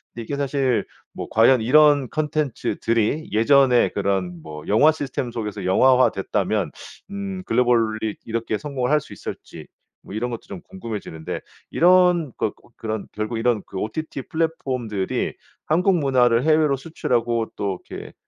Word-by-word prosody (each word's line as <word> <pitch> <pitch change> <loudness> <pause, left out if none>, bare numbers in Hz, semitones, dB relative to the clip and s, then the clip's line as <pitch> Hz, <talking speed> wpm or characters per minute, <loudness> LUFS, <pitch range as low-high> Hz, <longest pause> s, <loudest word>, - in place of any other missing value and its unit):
근데 115 - -5
이게 140 +5 -4
사실 135 -3 0 0.3
뭐 - - -6
과연 115 +2 +5
이런 145 +1 +5
콘텐츠들이 150 -3 -1
예전에 125 +3 +4
그런 95 -4 -2
뭐 75 -1 -9
영화 145 +10 +5
시스템 135 -4 -4
속에서 105 -4 -5
영화화 130 +7 +5
됐다면 - - -1 0.4
음 195 -2 -5
글로벌리 115 -3 +1
이렇게 115 -1 -2
성공을 130 -1 -3
할 150 +1 +3
수 - - -12
있을지 - - -9 0.3
뭐 100 - -10
이런 120 +3 -2
것도 115 - -5
좀 185 - -8
궁금해지는데 105 - -6 0.3
이런 175 -4 +4
것 110 - -1
그 - - -23
어 - - -27
그런 110 -2 -4
결국 110 +2 -3
이런 115 -2 +1
그 - - -8
OTT 135 +7 -4
플랫폼들이 130 - -2 0.3
한국 180 +3 +3
문화를 125 -3 +3
해외로 155 -2 +3
수출하고 120 -5 -1
또 100 -2 -2
이렇게 - - -8
125 Hz, 330 characters per minute, -22 LUFS, 110-150 Hz, 0.4 s, 과연